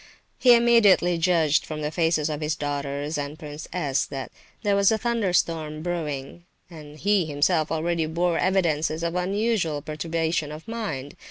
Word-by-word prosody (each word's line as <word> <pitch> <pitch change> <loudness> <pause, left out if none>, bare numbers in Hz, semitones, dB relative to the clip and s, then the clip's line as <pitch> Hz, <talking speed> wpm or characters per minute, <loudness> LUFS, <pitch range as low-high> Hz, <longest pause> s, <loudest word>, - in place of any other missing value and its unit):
He 245 -2 +7
immediately 210 -7 +4
judged 165 -3 +3
from 155 -1 -6
the 150 - -2
faces 160 -1 +1
of 155 -1 -4
his 155 0 -1
daughters 145 +1 -3
and 145 +1 -5
Prince 150 0 -8
S. 145 -7 0
that 135 -2 -6 0.3
there 205 -1 +2
was 200 +1 +4
a 220 - +2
thunderstorm 175 -9 0
brewing, 165 -2 -4 0.3
and 150 -2 -11
he 200 0 +2
himself 155 +2 +1
already 165 0 0
bore 170 +1 0
evidences 165 -4 +1
of 170 0 -1
unusual 180 -4 0
perturbation 160 0 -2
of 155 +6 -9
mind. 180 - -5
160 Hz, 155 wpm, -25 LUFS, 150-180 Hz, 0.3 s, He